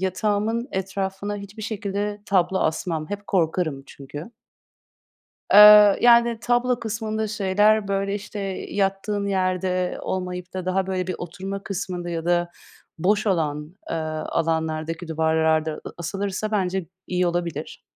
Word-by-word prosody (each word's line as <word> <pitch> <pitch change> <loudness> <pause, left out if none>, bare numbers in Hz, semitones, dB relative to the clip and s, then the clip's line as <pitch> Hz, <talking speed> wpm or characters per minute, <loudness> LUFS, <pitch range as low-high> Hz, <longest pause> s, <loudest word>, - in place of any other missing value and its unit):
yatağımın 210 +5 0
etrafına 195 +1 -3
hiçbir 200 +2 -9
şekilde 205 -1 -3
tablo 190 -1 +2
asmam. 155 -1 -1
Hep 205 0 -5
korkarım 165 -5 0
çünkü. 145 - -9 1.2
Eee, 210 -1 +10
yani 235 -1 +5
tablo 245 +1 +1
kısmında 220 -1 -3
şeyler, 205 +1 +2
böyle 195 0 0
işte, 210 +1 -6 0.3
yattığın 200 +1 -1
yerde 185 -1 0
olmayıp 180 -1 -4
da 185 -1 -3
daha 185 +1 0
böyle 185 -1 -2
bir 185 - -2
oturma 190 +3 -6
kısmında 180 -3 -4
ya 165 -1 -3
da 175 0 +1 0.5
boş 205 +5 +1
olan, 155 -4 -1 0.2
eee, - - -1 0.3
alanlardaki 160 +1 -1
duvarlarda 160 -1 +1
a - - -6
asılırsa 195 +4 -3
bence 190 -3 -1 0.2
iyi 180 0 0
olabilir. 170 -3 -3
190 Hz, 125 wpm, -23 LUFS, 175-205 Hz, 1.2 s, Eee